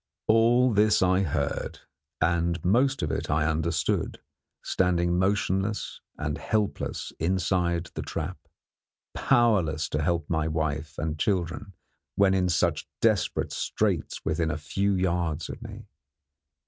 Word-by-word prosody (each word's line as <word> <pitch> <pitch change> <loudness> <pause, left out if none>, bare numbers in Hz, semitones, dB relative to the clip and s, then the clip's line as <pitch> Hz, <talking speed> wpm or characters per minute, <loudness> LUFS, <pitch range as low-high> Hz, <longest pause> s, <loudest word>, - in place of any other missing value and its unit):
All 120 +2 +4
this 105 -1 +4
I 95 +1 +3
heard, 80 -8 -2 0.4
and 85 0 0
most 130 - +2
of 75 - -1
it - - -3
I 75 +1 +2
understood, 80 +1 -1 0.4
standing 90 -1 +1
motionless 100 +1 0 0.2
and 75 0 -3
helpless 105 +2 -2
inside 90 -1 0
the - - -4
trap, - - -4 0.7
powerless 95 - +2
to 75 - -1
help 85 -1 0
my 80 -2 0
wife 80 -1 -2
and 80 -1 -3
children 95 +1 -1 0.4
when 100 -1 +4
in 90 -1 +2
such 85 - +1
desperate - - +1
straits - - -1
within 80 +1 0
a 85 - -2
few 100 +6 0
yards 85 -4 -1
of - - -7
me. - - -9
90 Hz, 125 wpm, -27 LUFS, 80-100 Hz, 0.7 s, All